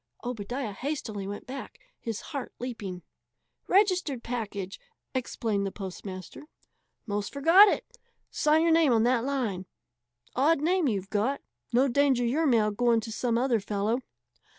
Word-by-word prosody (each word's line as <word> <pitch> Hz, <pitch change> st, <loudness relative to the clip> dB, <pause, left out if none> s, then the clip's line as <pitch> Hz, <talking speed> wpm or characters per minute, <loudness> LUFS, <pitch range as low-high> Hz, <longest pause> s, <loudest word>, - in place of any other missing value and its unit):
Obadiah 245 Hz, 0 st, -4 dB
hastily 220 Hz, -5 st, -4 dB
went 205 Hz, +1 st, -6 dB
back, 270 Hz, +2 st, -8 dB, 0.2 s
his 225 Hz, -3 st, -4 dB
heart 275 Hz, -4 st, -5 dB
leaping. 205 Hz, -8 st, -6 dB, 0.6 s
"Registered 365 Hz, -, +2 dB
package," 210 Hz, -5 st, -4 dB, 0.3 s
explained 225 Hz, -5 st, -1 dB
the 195 Hz, -, -2 dB
postmaster. 190 Hz, +6 st, -8 dB, 0.6 s
"'Most 205 Hz, -2 st, -3 dB
forgot 330 Hz, +9 st, +7 dB
it. -, -, 0 dB, 0.5 s
Sign 310 Hz, +1 st, +3 dB
your 335 Hz, -, +3 dB
name 320 Hz, -5 st, +5 dB
on 225 Hz, -1 st, +4 dB
that 240 Hz, -1 st, +2 dB
line. 235 Hz, -9 st, -2 dB, 0.7 s
Odd 290 Hz, +4 st, +3 dB
name 345 Hz, +1 st, +2 dB
you've 195 Hz, -5 st, -2 dB
got. 230 Hz, +7 st, 0 dB, 0.3 s
No 250 Hz, +3 st, +4 dB
danger 265 Hz, -2 st, +3 dB
your 300 Hz, +7 st, +1 dB
mail 220 Hz, -5 st, +3 dB
going 235 Hz, +2 st, +3 dB
to 225 Hz, +1 st, -7 dB
some 230 Hz, +1 st, 0 dB
other 245 Hz, -2 st, +2 dB
fellow." 210 Hz, +4 st, -1 dB
240 Hz, 140 wpm, -28 LUFS, 210-280 Hz, 0.7 s, forgot